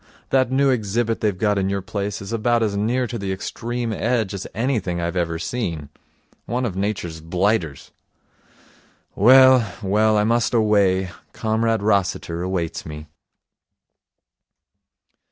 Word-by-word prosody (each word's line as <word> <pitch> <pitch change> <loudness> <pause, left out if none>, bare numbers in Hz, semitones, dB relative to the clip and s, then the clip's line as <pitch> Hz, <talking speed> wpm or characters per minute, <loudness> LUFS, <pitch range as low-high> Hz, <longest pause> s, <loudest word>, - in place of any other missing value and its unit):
That 130 -2 +2
new 135 +1 +3
exhibit 115 0 -1
they've 105 -4 0
got 105 +1 +1
in 95 0 0
your 100 -1 -2
place 100 0 -4
is 100 - -6
about 115 +1 +1
as 105 -2 -1
near 120 +5 0
to 120 -1 -5
the 100 -1 -3
Extreme 115 +4 -4
Edge 110 -3 -1
as 100 - -5
anything 110 -7 -1
I've 85 +1 -3
ever 85 -2 -1
seen. 85 - -4 0.6
One 125 +1 -1
of 100 -6 -3
Nature's 95 -5 -3
blighters. 90 -2 -1 1.2
Well, 130 -3 +6
well, 105 +2 +2
I 105 - +3
must 115 +2 +1
away. 100 -4 +2 0.2
Comrade 110 0 0
Rossiter 90 -4 0
awaits 90 -3 -3
me.' 75 0 -8
105 Hz, 135 wpm, -22 LUFS, 95-115 Hz, 1.2 s, Well